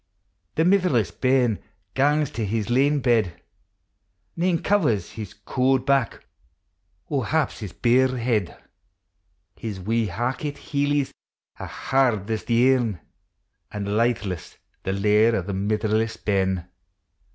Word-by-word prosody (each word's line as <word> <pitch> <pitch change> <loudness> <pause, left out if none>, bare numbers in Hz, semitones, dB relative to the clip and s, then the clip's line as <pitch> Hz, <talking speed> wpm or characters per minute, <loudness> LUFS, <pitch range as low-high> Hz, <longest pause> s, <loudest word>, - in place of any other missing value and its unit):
The 160 - +2
mitherless 180 - +3
bairn 125 -4 +2 0.3
pangs 145 +1 +2
to 115 - -3
his 110 +2 -2
lane 140 +3 +3
bed; 110 -9 +1 1.0
Xane 170 -1 0
covers 155 - +1
his 105 -3 -8
cauld 130 +5 0
back, 135 -4 +1 0.8
or 135 -6 -1
haps 155 -1 0
his 105 -6 -6
bare 130 +4 +2
head; 115 -6 -1 1.0
JJ 110 -4 -5
i« - - -9
wee 115 +2 +1
hackit 130 - -2
hcelics 145 -1 -1 0.5
are - - -5
hard 115 -6 0
as 110 - -2
the 125 +3 +4
aim, 115 -7 0 0.7
An' 105 -1 -4
litheless 110 -6 -1 0.2
the 95 - -2
lair 105 +3 +3
o1 95 -6 -1
the 100 - -4
mitherless 110 +3 0
bairn. 95 -3 0
115 Hz, 125 wpm, -24 LUFS, 105-135 Hz, 1.0 s, the